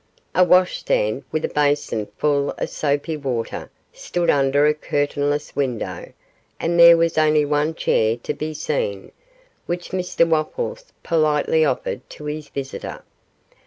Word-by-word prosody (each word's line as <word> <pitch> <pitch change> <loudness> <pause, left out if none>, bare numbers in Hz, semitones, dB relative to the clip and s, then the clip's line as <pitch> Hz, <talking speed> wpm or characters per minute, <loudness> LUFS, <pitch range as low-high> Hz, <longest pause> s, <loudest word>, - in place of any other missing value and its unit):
A 185 - +5
washstand, 180 - +2
with 155 - -1
a - - -3
basin 145 -7 0
full 145 -1 +1
of - - -3
soapy 145 +2 -1
water, 130 -6 -4 0.2
stood 175 -1 0
under 140 +1 +3
a 150 - +4
curtainless 145 0 -2
window, 130 -5 -3 0.5
and 170 +1 0
there 170 0 +9
was 165 -1 +1
only 155 -1 +3
one 150 +2 0
chair 110 -7 +1
to - - -2
be 155 0 -5
seen, 120 -10 -3 0.6
which 175 0 -4
Mr 180 -2 +1
Wopples 470 - -2
politely 155 -1 +2
offered 130 -3 -1
to 150 - -10
his 150 0 -5
visitor. 135 -1 -6
150 Hz, 135 wpm, -21 LUFS, 140-160 Hz, 0.6 s, there